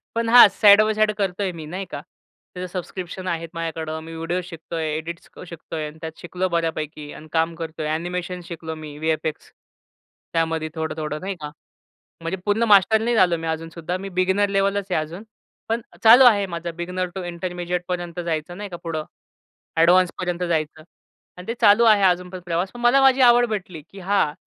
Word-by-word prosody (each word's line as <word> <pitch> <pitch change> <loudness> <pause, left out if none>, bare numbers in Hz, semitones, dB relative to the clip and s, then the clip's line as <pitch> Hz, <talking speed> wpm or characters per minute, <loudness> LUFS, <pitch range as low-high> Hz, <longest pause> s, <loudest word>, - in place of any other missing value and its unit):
पण 230 0 0
हा 245 -1 +10
side 205 -1 +8
by 215 0 +2
side 215 0 +2
करतोय 195 -1 -1
मी 155 - -7
नाही 185 +5 -5
का. - - -5 0.5
त्याचं 180 0 -5
सबस्क्रिप्शन 185 0 -6
आहेत 165 -2 -3
माझ्याकडं. 160 -1 -4
मी 165 0 -9
व्हिडिओज 170 +3 -2
शिकतोय, 165 -2 -5
एडिट्स 170 +2 -7 0.2
शिकतोय 160 -1 -6
आणि 150 +1 -11
त्यात 160 -1 -7
शिकलो 180 +1 -2
बऱ्यापैकी 155 -2 -3
आणि 155 - -11
काम 165 0 +1
करतोय. 160 -2 -5
एनिमेशन 180 +2 -4
शिकलो 160 -1 -6
मी, 155 -2 -9
VFX 155 0 -2 0.8
त्यामध्ये 160 -1 0
थोडं 160 -1 -3
थोडं 155 -1 -3
नाही 195 +1 -4
का. 150 0 -6 0.7
म्हणजे 165 +3 -2
पूर्ण 205 +2 +1
मास्टर 205 +2 +6
नाही 235 +1 0
झालो 180 -4 +4
मी 165 0 -6
अजूनसुद्धा. 165 +2 -4
मी - - -4
बिगिनर 190 +2 +2
लेवलच 195 0 0
आहे 155 - +2
अजून. 165 +5 -7 0.5
पण 225 +1 0 0.2
चालू 240 +4 +9
आहे 205 -5 +5
माझं 170 0 -5
बिगिनर 180 +2 -3
टू 190 - -4
इंटरमीडिएटपर्यंत 175 0 -4
जायचं 165 +1 -3
नाही 205 +1 -6
का 175 - -6
पुढं 160 -2 -3 0.8
एडव्हान्सपर्यंत 180 +1 +3
जायचं 155 -2 -2 0.6
आणि 180 - -10
ते 230 - -1
चालू 215 +1 +6
आहे 215 -3 +5
अजून 180 -1 +2
पण 185 0 -7
प्रवास. 175 +2 -1
पण 240 - -9
मला 240 +3 +5
माझी 270 0 +5
आवड 240 0 +6
भेटली 185 -7 -5
की 195 - -12
हा 190 -5 +1
175 Hz, 180 wpm, -22 LUFS, 160-195 Hz, 0.8 s, हा